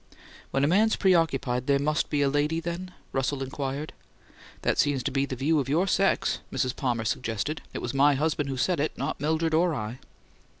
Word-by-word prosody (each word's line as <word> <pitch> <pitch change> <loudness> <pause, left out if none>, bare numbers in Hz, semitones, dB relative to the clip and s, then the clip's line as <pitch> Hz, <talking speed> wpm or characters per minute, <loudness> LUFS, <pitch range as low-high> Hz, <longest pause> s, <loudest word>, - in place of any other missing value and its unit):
"When 135 - 0
a - - +4
man's 215 +7 +3
preoccupied 135 -9 +2
there 140 -1 +4
must 150 +2 0
be 145 -1 +1
a - - +3
lady 145 +3 +1
then?" 170 +2 -5 0.2
Russell 135 +1 -1
inquired. 140 +2 -4 0.7
"That - - +1
seems 140 -3 +2
to - - -1
be 135 +1 0
the 130 - -4
view 150 +5 +2
of 135 -1 -2
your 165 +6 +2
sex," 195 0 +1
Mrs. 130 -1 -1
Palmer 120 -4 -1
suggested. 120 +7 -2
"It - - -6
was 120 - -3
my 140 +1 +4
husband 150 0 0
who 135 - -3
said 175 +5 +1
it, 150 - -1
not - - -3
Mildred 160 +2 +1
or 165 0 +3
I." 110 +3 -5
145 Hz, 200 wpm, -27 LUFS, 135-160 Hz, 0.7 s, a